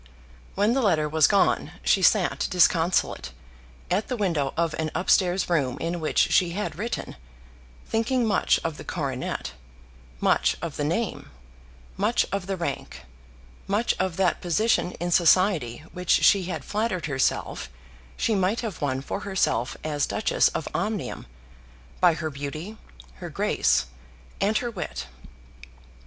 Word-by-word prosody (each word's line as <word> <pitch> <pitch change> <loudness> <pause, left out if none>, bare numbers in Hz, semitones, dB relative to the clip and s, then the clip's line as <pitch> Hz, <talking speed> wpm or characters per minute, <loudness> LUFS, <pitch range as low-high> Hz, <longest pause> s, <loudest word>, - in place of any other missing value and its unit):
When 205 +4 +2
the 270 - +1
letter 160 -9 +2
was 155 0 +4
gone 200 -2 +2
she - - +3
sat - - +3
disconsolate, 170 - +2 0.6
at 195 +4 +1
the 250 - -3
window 165 -10 0
of 165 -1 +1
an 160 -1 -1
up 180 - 0
stairs 185 0 +3
room 140 -7 0
in 170 +3 -2
which 155 - -3
she 175 -2 +3
had 210 +3 -3
written, 230 - -4 0.7
thinking 235 +2 0
much 210 -3 +2
of 165 -2 -3
the - - -8
coronet, 135 -6 -3 0.7
much - - +2
of 165 -3 -5
the 145 - -2
name, 175 +9 -2 0.7
much - - +2
of 195 -1 -3
the 195 -1 -2
rank, 140 - -5 0.6
much 210 +4 +1
of 185 -3 -1
that 190 -2 +1
position 180 +1 +1
in 175 0 -4
society 170 - +3
which 180 -1 -7
she 195 -3 +5
had 180 - -5
flattered 210 -5 -1
herself 135 - -1 0.5
she 225 - +1
might 195 +3 +1
have 220 -7 -5
won 135 -2 -1
for 140 - -4
herself 190 -10 -1
as 150 -2 -1
Duchess - - +2
of - - -3
Omnium - - -3 0.7
by 175 -3 +5
her 160 -1 -4
beauty, 150 +8 -6 0.4
her - - -7
grace, - - +1 0.5
and 210 +2 +2
her 240 -1 -2
wit. - - -5
175 Hz, 145 wpm, -25 LUFS, 155-200 Hz, 0.7 s, she